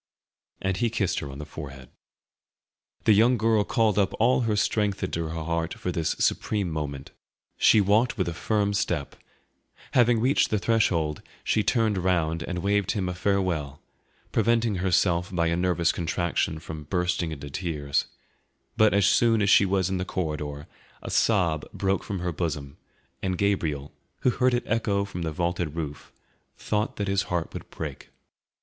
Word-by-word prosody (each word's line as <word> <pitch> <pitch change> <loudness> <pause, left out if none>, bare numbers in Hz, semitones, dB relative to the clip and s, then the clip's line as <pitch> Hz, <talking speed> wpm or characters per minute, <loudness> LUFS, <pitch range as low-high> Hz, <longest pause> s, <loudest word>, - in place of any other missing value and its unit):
And 95 -1 0
he 120 +1 +1
kissed 105 -5 0
her 70 - -6
on 70 - -8
the 75 - -6
forehead. 70 -4 -9 1.1
The 110 - +5
young 120 +4 +4
girl 110 -1 +3
called 105 -1 +2
up 95 -2 +1
all 125 +3 +4
her 110 -3 +1
strength 105 -1 0
into 85 -3 -2
her 80 0 -4
heart 85 +1 -2
for 90 - -3
this 80 -2 -1
supreme 100 -5 0
moment; 70 -3 -5 0.4
she 110 - +5
walked 105 +5 +2
with 95 -4 0
a 85 - -2
firm 100 +3 0
step; 85 -7 -1 0.8
having 120 -2 +4
reached 130 +5 +2
the 110 - +1
threshold, 90 -9 +1 0.2
she 110 - +2
turned 110 -3 +1
round 85 -3 +1
and 90 0 -4
waved 100 -2 +1
him 95 -3 -1
a 90 - -2
farewell, 90 -7 -1 0.5
preventing 115 -3 +2
herself 90 0 +1
by 85 -2 +1
a 85 0 +1
nervous 90 -1 +2
contraction 85 -1 -1
from 80 -1 -8
bursting 90 0 -1
into 70 -2 -7
tears, 75 -4 -1 0.7
but 110 -2 +4
as 100 -2 +4
soon 115 +1 +4
as 100 -1 +3
she 100 - +6
was 95 -1 +1
in 95 -1 -2
the - - -1
corridor, 75 -5 -4 0.4
a - - -5
sob 85 -8 +2
broke 95 0 0
from 95 -3 -4
her 90 -1 -1
bosom, 75 -4 -3 0.5
and 95 -1 -1
Gabriel, 80 -8 0 0.3
who 125 - +3
heard 125 0 +2
it 120 - -1
echo 105 -3 0
from 95 -3 -6
the 80 -1 -2
vaulted 85 -1 -2
roof, 75 -3 -6 0.5
thought 105 +1 -1
that 100 - -3
his 100 0 +2
heart 85 -2 -2
would - - -8
break. - - -7
90 Hz, 170 wpm, -26 LUFS, 80-105 Hz, 1.1 s, she